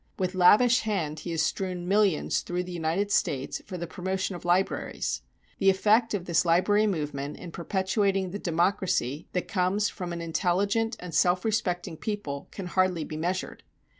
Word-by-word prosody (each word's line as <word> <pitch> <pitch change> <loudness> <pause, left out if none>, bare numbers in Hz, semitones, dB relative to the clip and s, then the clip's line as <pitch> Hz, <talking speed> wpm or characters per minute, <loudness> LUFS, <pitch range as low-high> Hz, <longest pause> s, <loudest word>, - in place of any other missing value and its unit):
With 185 -1 -1
lavish 215 +7 +6
hand 170 -9 -2
he 165 - -7
has 165 -1 0
strewn 180 +1 -2
millions 200 -4 +2
through 175 0 -3
the 180 - -8
United 175 +4 -1
States 135 -8 0
for 185 - -5
the 170 - -4
promotion 190 +2 -3
of 175 - -9
libraries. 175 +2 0 0.4
The 195 - +5
effect 215 +4 +3
of 180 -3 -4
this 170 -2 +2
library 195 +5 +3
movement 150 -6 -3
in 175 - -9
perpetuating 190 +2 0
the 205 - -5
democracy 170 -5 0
that 180 - -1
comes 195 +1 +1
from 180 -3 -6
an 170 - -4
intelligent 195 +7 0
and 180 -2 -8
self 180 +4 +3
respecting 180 -7 -1
people 170 -10 -4
can 195 - -7
hardly 180 -2 +1
be 155 - -6
measured. 175 +4 -3
180 Hz, 165 wpm, -27 LUFS, 170-200 Hz, 0.4 s, lavish